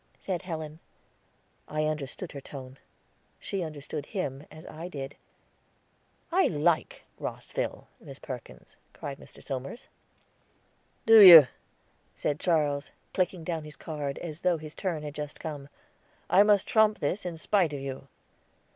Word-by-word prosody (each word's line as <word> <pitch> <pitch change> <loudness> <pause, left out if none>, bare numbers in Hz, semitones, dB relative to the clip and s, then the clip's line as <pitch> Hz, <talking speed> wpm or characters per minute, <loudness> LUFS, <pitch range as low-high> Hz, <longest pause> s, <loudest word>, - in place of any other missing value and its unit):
said 185 -3 -3
Helen. 160 -3 -6 0.9
I 155 0 -1
understood 155 +3 -4
her 140 - -8
tone; 130 -1 -10 0.6
she 195 - -3
understood 150 -2 -6
him, 145 -9 -4
as 155 +1 -13
I 165 +3 -7
did. 140 -5 -6 1.2
"I 375 +3 +4
like 160 +1 0 0.2
Rosville, - - -4
Miss - - -11
Perkins," - - -10 0.2
cried 140 -1 -7
Mr. - - -15
Somers. 135 - -6 1.2
"Do 225 0 +9
you?" 170 -7 +12 0.7
said 145 0 -1
Charles, 150 -4 +1 0.2
clicking 180 -2 0
down 160 -1 -3
his 150 0 -9
card, 145 -2 -5
as 160 -2 -7
though 180 -2 +2
his 155 -1 -9
turn 170 -6 -3
had 150 -1 -6
just 150 0 -6
come. 145 -3 -6 0.6
"I 195 - +7
must 205 -1 +4
trump 215 -1 +4
this 160 +8 -2
in 175 -2 -5
spite 180 -1 +2
of 145 - -4
you." 135 0 -6
155 Hz, 140 wpm, -28 LUFS, 145-180 Hz, 1.2 s, you